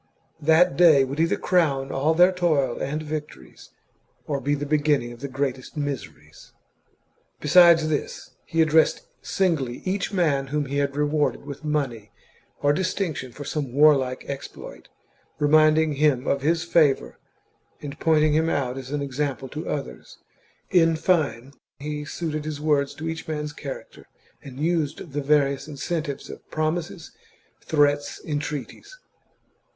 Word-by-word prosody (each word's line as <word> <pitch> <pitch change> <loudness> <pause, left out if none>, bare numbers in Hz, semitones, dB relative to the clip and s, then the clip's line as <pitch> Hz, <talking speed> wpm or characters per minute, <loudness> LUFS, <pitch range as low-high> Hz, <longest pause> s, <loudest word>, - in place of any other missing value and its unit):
That 160 +4 +4
day 160 -6 +6
would 135 +3 -4
either 165 +1 +2
crown 140 -7 +1
all 150 +4 +1
their 180 +2 +6
toil 155 -9 0
and 150 +3 -3
victories, 150 - -8 0.6
or 140 -2 -2
be 145 +1 0
the 145 0 -4
beginning 145 -4 +1
of 120 - -11
the 140 - -5
greatest 135 +1 -4
miseries! 80 - -6 0.9
Besides 165 +1 +6
this, 155 -2 -3 0.2
he 165 -1 +3
addressed 160 0 +3 0.2
singly 155 -10 -1
each 190 +1 -1
man 150 -8 +1
whom 150 +1 -1
he 140 +1 -3
had 140 -1 0
rewarded 150 0 0
with 140 +2 -8
money 135 -8 -2 0.5
or 145 0 +4
distinction 165 -6 -2
for 145 +4 -9
some 140 -4 -3
warlike 135 -3 +3
exploit, 140 -1 -8 0.5
reminding 155 +1 +4
him 140 -3 +2
of 140 - 0
his 165 +3 +1
favour, 160 -5 +2 0.6
and 145 +1 -8
pointing 155 -2 +3
him 160 +2 +2
out 135 -4 -1
as 130 -1 -9
an 145 0 -2
example 135 -1 -3
to 155 +5 -6
others. 140 -2 -6 0.5
In 165 -2 +4
fine, 140 -7 0 0.2
he 150 +1 -5
suited 155 0 -4
his 155 -1 -5
words 145 -2 +1
to 160 - -6
each 160 0 -5
man's 150 -1 -4
character, 140 -3 -9 0.3
and 135 -1 -11
used 155 -1 -1
the 145 +2 -2
various 140 -1 +1
incentives 150 0 -4
of - - -11
promises, 160 +2 -3 0.5
threats, 145 -1 +1
entreaties. 150 - -5
150 Hz, 140 wpm, -24 LUFS, 140-160 Hz, 0.9 s, day